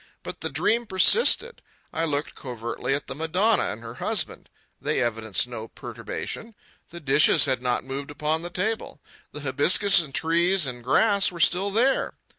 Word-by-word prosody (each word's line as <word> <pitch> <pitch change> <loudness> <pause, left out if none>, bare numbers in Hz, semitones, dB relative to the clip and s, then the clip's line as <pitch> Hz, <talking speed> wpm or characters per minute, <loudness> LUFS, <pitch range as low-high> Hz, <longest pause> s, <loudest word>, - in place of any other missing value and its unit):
But - - -8
the - - -1
dream 235 +1 0
persisted. 465 - +3 0.3
I 165 +1 -1
looked 145 -1 -3
covertly 125 +1 -4
at 140 - -5
the - - -6
Madonna 185 +9 +1
and 110 +3 -5
her 115 0 -8
husband. - - -3 0.3
They - - -1
evidenced 115 -1 0
no 115 -2 -7
perturbation. 225 - -7 0.3
The 170 - -9
dishes 145 +1 +4
had 130 -3 0
not 125 -1 0
moved 135 +2 -6
upon 150 +2 -2
the 175 - -6
table. 205 -1 -3 0.3
The 150 - -8
hibiscus 175 +9 +3
and 150 -4 -9
trees 170 +4 +1
and 120 -2 -6
grass 200 - +3
were 170 - -10
still 180 +4 +2
there. 245 +7 +1
155 Hz, 165 wpm, -24 LUFS, 130-190 Hz, 0.3 s, dishes